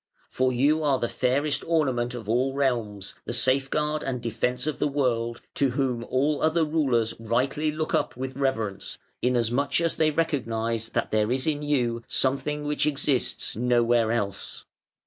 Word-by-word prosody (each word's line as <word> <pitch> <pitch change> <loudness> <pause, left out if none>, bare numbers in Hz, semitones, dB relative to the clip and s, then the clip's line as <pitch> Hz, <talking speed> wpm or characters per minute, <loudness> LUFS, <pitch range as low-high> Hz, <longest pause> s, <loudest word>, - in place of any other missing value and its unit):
For 130 0 +1
you 145 +6 +2
are 145 -3 +2
the 120 - -1
fairest 135 +5 0
ornament 130 -7 +1
of 115 -4 -7
all 130 +4 +1
realms, 115 -8 -1
the - - -3
safeguard 135 +4 +1
and 130 -2 -3
defence 125 +2 -2
of 155 - -2
the - - +2
world; 120 -5 -1
to 140 - +2
whom 125 -2 -1
all 145 +3 +1
other 160 +1 +3
rulers 135 -8 +1
rightly 130 +7 0
look 155 +1 -3
up - - 0
with 130 0 -4
reverence, 115 -8 -2 0.2
inasmuch 125 +4 +1
as 165 -1 +1
they 155 -1 +3
recognise 115 -8 -1
that - - -2
there 110 +1 +2
is 130 0 +1
in 150 -2 0
you 125 -6 0
something 150 +3 0
which 150 +1 0
exists 140 -3 0
nowhere 120 -1 +2
else. 105 -5 -3
130 Hz, 160 wpm, -26 LUFS, 120-145 Hz, 0.2 s, other